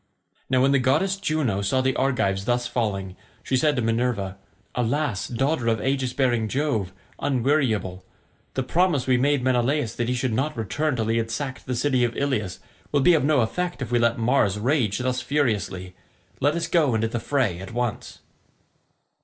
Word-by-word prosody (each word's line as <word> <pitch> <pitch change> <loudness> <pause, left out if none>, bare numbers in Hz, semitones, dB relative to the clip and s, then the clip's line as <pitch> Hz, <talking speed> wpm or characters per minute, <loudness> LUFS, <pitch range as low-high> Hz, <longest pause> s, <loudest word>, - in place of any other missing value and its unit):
Now 130 0 +3
when 135 - +4
the 140 - +4
goddess 155 +10 +2
Juno 155 - -1
saw 100 +7 +1
the 130 0 +1
Argives 100 -8 0
thus 120 0 +1
falling, 100 -6 -2 0.3
she 130 - -1
said 150 +3 +3
to 125 - -1
Minerva, 115 -4 -1 0.3
"Alas, 125 -2 -1
daughter 135 +1 0
of 115 -1 +2
aegis 130 +1 0
bearing 120 -4 +1
Jove, 120 -7 -1 0.3
unweariable, 120 -9 0 0.5
the 130 - 0
promise 165 -1 +1
we 130 -1 +3
made 140 +1 +2
Menelaus 130 -1 +1
that 120 0 -1
he 125 - +1
should 125 -1 -1
not 140 +5 -1
return 145 +7 -1
till 115 -3 -1
he 115 +1 +1
had 115 0 -1
sacked 130 +1 -5
the 125 - -1
city 130 0 +1
of 120 -1 -1
Ilius 120 -10 -1 0.3
will 145 - +2
be 175 +6 +6
of 160 - +3
no 145 -2 +3
effect 175 +10 -2
if 125 -3 -5
we 120 - +3
let 115 0 +2
Mars 115 -4 +2
rage 115 -2 +1
thus 125 0 -1
furiously. 110 -9 -1 0.5
Let 145 +3 +2
us 170 -1 -1
go 150 -9 +2
into 110 0 +1
the 120 +1 -3
fray 115 -9 0
at 95 +1 -8
once." 120 -1 -3
125 Hz, 185 wpm, -24 LUFS, 115-140 Hz, 0.5 s, be